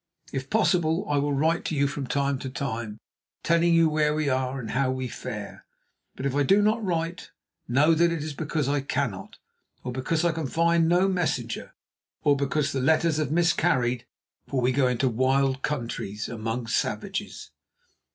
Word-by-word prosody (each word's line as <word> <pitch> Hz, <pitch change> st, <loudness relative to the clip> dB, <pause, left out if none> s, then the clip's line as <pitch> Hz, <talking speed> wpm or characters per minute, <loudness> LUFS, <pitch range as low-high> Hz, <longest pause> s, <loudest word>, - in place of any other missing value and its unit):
If 135 Hz, 0 st, -4 dB
possible, 180 Hz, -4 st, +2 dB
I 145 Hz, -, +1 dB
will 145 Hz, +1 st, 0 dB
write 160 Hz, +4 st, +1 dB
to 160 Hz, -, -2 dB
you 140 Hz, 0 st, +2 dB
from 140 Hz, -1 st, -3 dB
time 140 Hz, -1 st, 0 dB
to 130 Hz, -, -5 dB
time, 115 Hz, -5 st, -4 dB, 0.5 s
telling 170 Hz, 0 st, +3 dB
you 165 Hz, -1 st, +5 dB
where 150 Hz, -1 st, +1 dB
we 155 Hz, -2 st, 0 dB
are 130 Hz, 0 st, -1 dB
and 115 Hz, -4 st, -5 dB
how 130 Hz, +2 st, +1 dB
we 130 Hz, 0 st, -2 dB
fare. 110 Hz, -4 st, -7 dB, 0.5 s
But 130 Hz, -, -5 dB
if 140 Hz, -, 0 dB
I 145 Hz, -, +2 dB
do 195 Hz, +9 st, +4 dB
not 215 Hz, +2 st, +2 dB
write, 170 Hz, -2 st, -2 dB, 0.4 s
know 145 Hz, +7 st, +4 dB
that 170 Hz, +1 st, +3 dB
it 165 Hz, -3 st, -2 dB
is 155 Hz, -1 st, -4 dB
because 150 Hz, -1 st, -2 dB
I 145 Hz, 0 st, +1 dB
cannot, 125 Hz, -8 st, -3 dB, 0.5 s
or 125 Hz, -, -4 dB
because 155 Hz, +6 st, -1 dB
I 170 Hz, -, +3 dB
can 160 Hz, -3 st, -3 dB
find 165 Hz, +2 st, +2 dB
no 180 Hz, +2 st, +4 dB
messenger, 160 Hz, -11 st, -2 dB, 0.5 s
or 145 Hz, -, +4 dB
because 140 Hz, +1 st, 0 dB
the 135 Hz, -, -1 dB
letters 160 Hz, +2 st, +3 dB
have 155 Hz, -4 st, 0 dB
miscarried, 130 Hz, -7 st, +1 dB, 0.4 s
for 135 Hz, -, -1 dB
we 125 Hz, +1 st, +2 dB
go 130 Hz, 0 st, +2 dB
into 125 Hz, +1 st, +1 dB
wild 130 Hz, +2 st, +1 dB
countries, 115 Hz, -7 st, -3 dB
amongst 115 Hz, +1 st, -3 dB
savages." 200 Hz, 0 st, -4 dB
140 Hz, 180 wpm, -26 LUFS, 130-165 Hz, 0.5 s, you